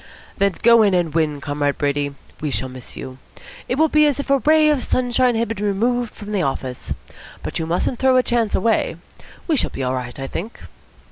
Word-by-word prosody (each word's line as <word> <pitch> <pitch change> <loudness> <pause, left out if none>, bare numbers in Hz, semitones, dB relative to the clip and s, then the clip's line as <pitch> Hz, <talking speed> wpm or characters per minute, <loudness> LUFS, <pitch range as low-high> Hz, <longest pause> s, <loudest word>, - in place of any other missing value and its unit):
"Then 200 -1 +2
go 235 0 +7
in 200 -3 +4
and 170 -4 0
win, 155 -3 0
Comrade 145 0 -1
Brady. 145 0 -1 0.3
We 150 - -1
shall 130 -1 -2
miss 130 -1 -10
you. 130 0 -8 0.5
It 250 - 0
will 315 +3 +4
be 305 0 +4
as 285 -2 0
if 280 - -3
a 275 - +4
ray 310 +2 +4
of 295 -4 +2
sunshine 250 -1 +1
had 230 +1 0
been 210 -2 -4
removed 235 +4 0
from 210 -1 -8
the 200 -3 0
office. 130 -4 -3 0.5
But - - -3
you 160 - -2
mustn't 180 +8 -1
throw 260 -1 +4
a 255 - +4
chance 235 -4 0
away. 215 -4 +1 0.5
We 325 - +1
shall - - +1
be 135 - -5
all 130 0 0
right, 125 0 -5
I 135 - -3
think." 195 - -6
205 Hz, 215 wpm, -21 LUFS, -, 0.5 s, go